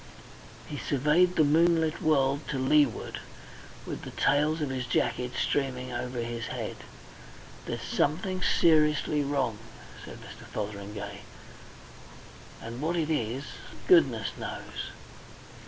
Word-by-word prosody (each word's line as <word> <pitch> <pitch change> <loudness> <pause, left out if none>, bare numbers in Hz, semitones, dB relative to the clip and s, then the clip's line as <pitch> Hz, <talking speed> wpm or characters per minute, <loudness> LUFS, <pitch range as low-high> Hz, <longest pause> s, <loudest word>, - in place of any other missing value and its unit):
He 145 - -6
surveyed 150 +6 +3
the 155 - +5
moonlit 160 +1 +3
world 140 -2 +2
to 140 - -2
leeward, 145 +3 +2 0.7
with - - -5
the - - -7
tails 150 +3 +2
of 145 -3 -1
his 130 -2 -3
jacket 125 +1 0
streaming 130 -2 -1
over 125 0 -3
his 115 0 -4
head. - - -4 0.9
"There's - - -4
something 185 +5 0
seriously 150 -3 +3
wrong," 135 -6 -1 0.4
said - - -9
Mr. - - -11
Fotheringay. 100 -1 -5 1.4
"And 115 +3 -6
what 165 +3 0
it 160 -2 0
is 125 -2 -1 0.4
goodness 360 -3 +5
knows." - - -5
145 Hz, 115 wpm, -29 LUFS, 125-155 Hz, 1.4 s, the